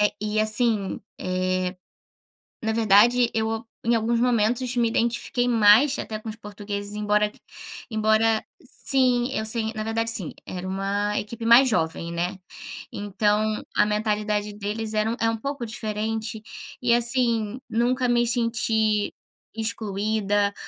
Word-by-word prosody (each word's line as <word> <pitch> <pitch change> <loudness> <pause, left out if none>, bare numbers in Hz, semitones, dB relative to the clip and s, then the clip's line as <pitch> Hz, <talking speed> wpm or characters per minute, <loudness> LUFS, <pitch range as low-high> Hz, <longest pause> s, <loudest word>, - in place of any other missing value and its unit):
Eh, 210 - +3
e 215 0 -1
assim, 215 -2 0 0.2
eh, 185 0 -1 0.9
na 220 0 -1
verdade 230 +3 +4
eu 225 +1 -1 0.2
em 235 +1 +3
alguns 230 +1 +1
momentos 245 +1 +1
me 240 -1 +2
identifiquei 235 +1 0
mais 230 +5 +5
até 215 -1 -5
com 220 - -11
os 220 - -5
portugueses, 205 -1 -6
embora 210 0 +1 0.6
embora 220 0 +2 0.2
sim, 255 -2 +1
eu 220 - -2
sei. 220 0 0
Na 215 -1 -4
verdade 225 +1 -1
assim, 195 -8 -1
era 185 0 -6
uma 200 +2 -1
equipe 225 +2 -5
mais 245 +3 +7
jovem, 165 -4 -1
né. 175 +3 -2 0.5
Então 210 +1 0
a - - +5
mentalidade 210 0 -1
deles 215 +2 -4
era 215 +1 +1
um - - -2
é 225 - +3
um 225 - -2
pouco 275 +1 -4
diferente, 220 0 -3 0.4
e 245 -1 +3
assim, 235 -2 +2
nunca 250 +2 +1
me 240 0 +2
senti 225 -3 +1 0.4
excluída 205 -2 -1
220 Hz, 135 wpm, -24 LUFS, 210-235 Hz, 0.9 s, mais